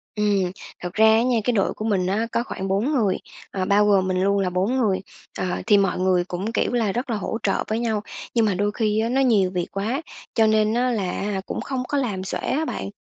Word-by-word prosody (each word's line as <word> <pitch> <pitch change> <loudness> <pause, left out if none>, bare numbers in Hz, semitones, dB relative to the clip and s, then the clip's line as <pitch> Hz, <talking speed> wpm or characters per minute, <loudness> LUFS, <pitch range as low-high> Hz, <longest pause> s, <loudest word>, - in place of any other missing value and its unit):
Ừm, 200 -4 +1 0.3
thật 180 -1 -6
ra 220 - +4
á 220 +1 +6
nha, 245 -2 +2
cái 245 - +1
đội 195 -4 +1
của 215 - -6
mình 195 -5 +1
á 215 +4 0
có 235 - 0
khoảng 195 -5 -5
4 200 +9 +1
người, 220 -10 +2 0.3
ờ, 190 -1 -2
bao 205 +2 +4
gồm 195 -2 +3
mình 185 0 0
luôn 200 +1 +2
là 190 -2 +1
bốn 190 +8 0
người. 200 -7 +1 0.4
Ờ, - - -1 0.2
thì 210 -2 +6
mọi 195 -2 +1
người 185 -1 +2
cũng, 185 +4 -4
kiểu 240 - 0
là, 225 -4 +1
rất 245 +5 -3
là 230 - 0
hỗ 215 - -3
trợ - - +1
với 220 +1 -1
nhau, 220 -3 0 0.3
nhưng 230 -2 +3
mà 205 - +2
đôi 205 +2 0
khi 215 -1 +1
á 225 +1 0
nó 265 +2 +2
nhiều 210 -8 +3
việc 180 -2 -2
quá, 220 +9 -2 0.3
cho 220 -1 +4
nên 215 0 +3
á 250 +2 +1
là 200 -6 -1
á - - -4
hả 195 -1 -2
cũng - - -4
không 265 -2 -3
có 290 - -1
làm 210 -9 -1
xuể 190 - -3
á 315 +3 -1
bạn. 95 - -4
210 Hz, 260 wpm, -23 LUFS, 190-230 Hz, 0.4 s, á